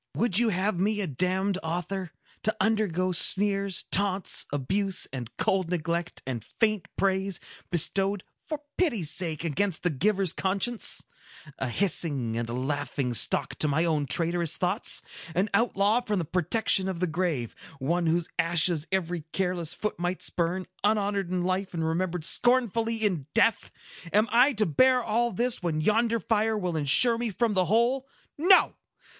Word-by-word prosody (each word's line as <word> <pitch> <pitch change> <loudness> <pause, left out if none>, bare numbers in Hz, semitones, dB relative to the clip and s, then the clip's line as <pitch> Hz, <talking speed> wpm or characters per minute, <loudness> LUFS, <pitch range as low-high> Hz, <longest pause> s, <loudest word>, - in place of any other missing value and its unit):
Would 220 -3 +1
you 240 -1 +3
have 190 -1 0
me 210 +3 0
a 200 - -1
damned 185 +5 -1
author?—To 180 +5 -4
undergo 190 -4 +1
sneers, 195 +1 +2
taunts, 195 -1 +1
abuse, 190 +8 -1
and 125 -4 -5
cold 190 -3 0
neglect, 170 0 -3
and 125 -4 -4
faint 215 - -1
praise, 190 -1 0 0.3
bestowed, 195 +3 +1 0.2
for 305 -2 -5 0.2
pity's 230 - +1
sake, 165 -2 -2
against 175 +2 -1
the 180 - +1
giver's 190 +4 +1
conscience! 200 +5 0 0.5
A 130 - -2
hissing 140 - 0
and 115 0 -3
a - - -4
laughing 135 0 -2
stock 115 - +2
to 155 - +3
my 155 +4 +1
own 150 -4 0
traitorous 170 +2 +1
thoughts! 185 +5 0 0.3
An 195 +4 0
outlaw 215 +1 +2
from 210 -4 -2
the 170 - -1
protection 185 +3 +2
of 185 -3 -4
the 180 - +1
grave,—one 165 0 -3
whose 165 +1 +1
ashes 165 -1 +1
every 175 -4 -2
careless 180 -4 -1
foot 210 -5 -4
might 175 +1 -2
spurn, 180 +2 -1 0.2
unhonored 205 -3 0
in 180 -1 -1
life, 185 +1 -2
and 165 -1 -1
remembered 170 0 -1
scornfully 230 -1 +2
in 170 -9 -1
death! 230 -1 +2 0.4
Am 210 +2 +3
I 250 +5 +5
to 215 -2 +1
bear 255 - +3
all 235 +2 0
this, 240 +4 -1
when 165 -3 -1
yonder 225 +6 +1
fire 220 0 0
will 180 -4 -2
insure 195 - +5
me 240 -1 -1
from 220 +2 0
the 185 -2 +2
whole? 240 +7 +1 0.3
No! 365 +5 +5
185 Hz, 155 wpm, -27 LUFS, 165-215 Hz, 0.5 s, I